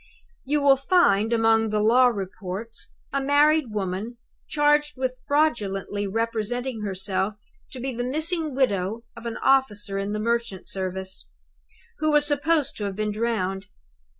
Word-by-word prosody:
"'You 290 +1 +1
will 275 -1 +6
find, 260 - +3
among 225 -1 +3
the 210 0 0
law 240 +4 +5
reports, 200 0 -5 0.2
a 275 - +1
married 295 +2 +4
woman 205 +3 -3 0.3
charged 295 -1 +2
with 260 -1 -1
fraudulently 205 -9 0
representing 230 +3 -2
herself 195 0 -2 0.3
to 260 - -8
be 260 +1 -3
the 245 - -2
missing 310 +3 -1
widow 220 -4 0
of 235 0 -7
an 230 - -4
officer 210 -7 +2
in 200 +1 -3
the 210 - -2
merchant 230 -3 -2
service, 190 0 -5 0.7
who 310 - +1
was 295 -1 +4
supposed 290 0 +1
to 210 - -3
have 200 -1 -3
been 210 +1 -1
drowned. 205 -3 -2
230 Hz, 145 wpm, -25 LUFS, 205-275 Hz, 0.7 s, will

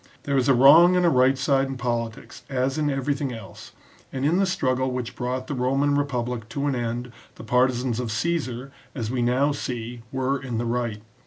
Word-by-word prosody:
There 140 - -1
is 135 0 +2
a 135 - +6
wrong 160 +8 +7
and 180 -1 +3
a - - +5
right 130 0 +4
side 135 0 +1
in 135 -1 -5
politics 120 -1 -4
as 135 +2 -1
in 150 -1 +1
everything 135 0 -1
else, 110 -5 -10 0.4
and 130 +1 -3
in 165 +4 +3
the 195 0 +2
struggle 130 -8 0
which 125 -2 -4
brought 125 +1 -3
the 145 - -4
Roman 135 +3 +1
republic 125 -5 -2
to 140 +5 -3
an 145 - +1
end 120 0 -3 0.2
the - - -11
partisans 125 0 +1
of 120 -3 -3
Caesar, 135 -1 -2 0.2
as 115 -3 -3
we 125 -1 -1
now 130 +4 +2
see, 120 -4 -5
were 130 +1 -1
in 125 -4 -4
the 120 - -1
right. 115 -3 -2
130 Hz, 200 wpm, -24 LUFS, 120-140 Hz, 0.4 s, wrong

